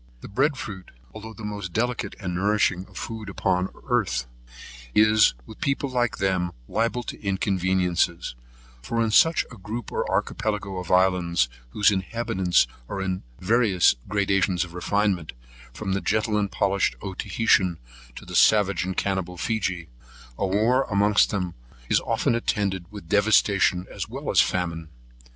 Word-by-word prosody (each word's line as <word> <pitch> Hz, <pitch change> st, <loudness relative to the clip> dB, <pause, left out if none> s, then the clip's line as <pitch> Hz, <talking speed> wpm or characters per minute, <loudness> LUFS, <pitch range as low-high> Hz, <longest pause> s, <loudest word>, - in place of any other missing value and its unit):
The -, -, -8 dB
Bread 135 Hz, +7 st, +1 dB
fruit, 95 Hz, -7 st, -7 dB, 0.2 s
although 110 Hz, +1 st, -9 dB
the 110 Hz, -, -10 dB
most 100 Hz, -4 st, -5 dB
delicate 120 Hz, +1 st, -1 dB
and 90 Hz, -3 st, -4 dB
nourishing 95 Hz, -1 st, +1 dB
food 110 Hz, -1 st, -7 dB
upon 90 Hz, -1 st, 0 dB, 0.2 s
earth, 100 Hz, -, 0 dB, 0.7 s
is, 110 Hz, -, +5 dB
with 110 Hz, -, -13 dB
people 140 Hz, -3 st, -1 dB
like 120 Hz, -3 st, 0 dB
them, 95 Hz, -2 st, 0 dB
liable 115 Hz, +2 st, -1 dB
to -, -, -8 dB
inconveniencies; 95 Hz, -, 0 dB, 0.5 s
for 115 Hz, -, -3 dB
in 115 Hz, -1 st, +1 dB
such 160 Hz, +8 st, +5 dB
a 120 Hz, -, -10 dB
group 110 Hz, +4 st, -6 dB
or -, -, -2 dB
Archipelago 105 Hz, -4 st, -2 dB
of 90 Hz, -, -7 dB
islands, 90 Hz, -7 st, +3 dB, 0.2 s
whose 105 Hz, -, +3 dB
inhabitants 95 Hz, -2 st, +1 dB, 0.2 s
are 100 Hz, -, -4 dB
in 95 Hz, -1 st, -2 dB, 0.2 s
such -, -, -12 dB
various 110 Hz, -6 st, +4 dB
gradations 95 Hz, -3 st, +1 dB
of 85 Hz, -, -13 dB
refinement, 95 Hz, -2 st, 0 dB, 0.4 s
from 95 Hz, -, -4 dB
the 100 Hz, -, -1 dB
gentle 110 Hz, +1 st, 0 dB
and 105 Hz, -2 st, 0 dB
polished 100 Hz, 0 st, +1 dB
Otaheitean, 95 Hz, -2 st, +1 dB, 0.4 s
to -, -, -10 dB
the -, -, -9 dB
savage 100 Hz, -3 st, +4 dB
and 95 Hz, 0 st, -4 dB
cannibal 95 Hz, -2 st, -1 dB
Feegee, 90 Hz, -4 st, -2 dB, 0.5 s
a 95 Hz, -, -1 dB
war 110 Hz, +7 st, +2 dB
amongst 105 Hz, 0 st, +3 dB
them 90 Hz, -4 st, -2 dB, 0.4 s
is -, -, +4 dB
often -, -, 0 dB
attended 100 Hz, -6 st, -1 dB
with 100 Hz, -5 st, -10 dB
devastation 100 Hz, -2 st, +3 dB
as -, -, -5 dB
well -, -, -4 dB
as -, -, +6 dB
famine. 85 Hz, -3 st, -2 dB
100 Hz, 150 wpm, -25 LUFS, 90-110 Hz, 0.7 s, as